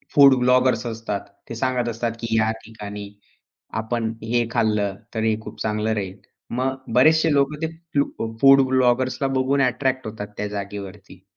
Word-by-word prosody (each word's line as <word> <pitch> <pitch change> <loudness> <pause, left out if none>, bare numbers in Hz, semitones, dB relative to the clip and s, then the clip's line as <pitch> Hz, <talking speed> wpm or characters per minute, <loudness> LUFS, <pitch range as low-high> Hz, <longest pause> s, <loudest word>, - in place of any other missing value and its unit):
Food 140 -2 +8
bloggers 125 0 +3
असतात. 115 -3 -3 0.3
ते 115 - -5
सांगत 125 0 0
असतात, 115 +1 -2
की 115 -1 -2
या 110 0 +3
ठिकाणी 105 -2 -8 0.7
आपण 110 0 -2
हे 120 +1 +1
खाल्लं, 105 -4 +1 0.2
तर 110 -1 -1
हे 110 -1 +2
खूप - - -10
चांगलं 110 +1 0
राहील. 95 -3 -3 0.4
मग 130 +1 0 0.2
बरेचसे 160 +6 +5
लोकं 140 +1 +1
ते 160 - 0 0.3
फू 115 -5 -2
फूड 135 0 +8
ब्लॉगर्सला 130 +1 +2
बघून 135 +2 +2
अट्रॅक्ट 130 0 0
होतात 105 -1 -6
त्या 105 - -2
जागेवरती. 100 -2 -7
115 Hz, 155 wpm, -23 LUFS, 105-130 Hz, 0.7 s, फूड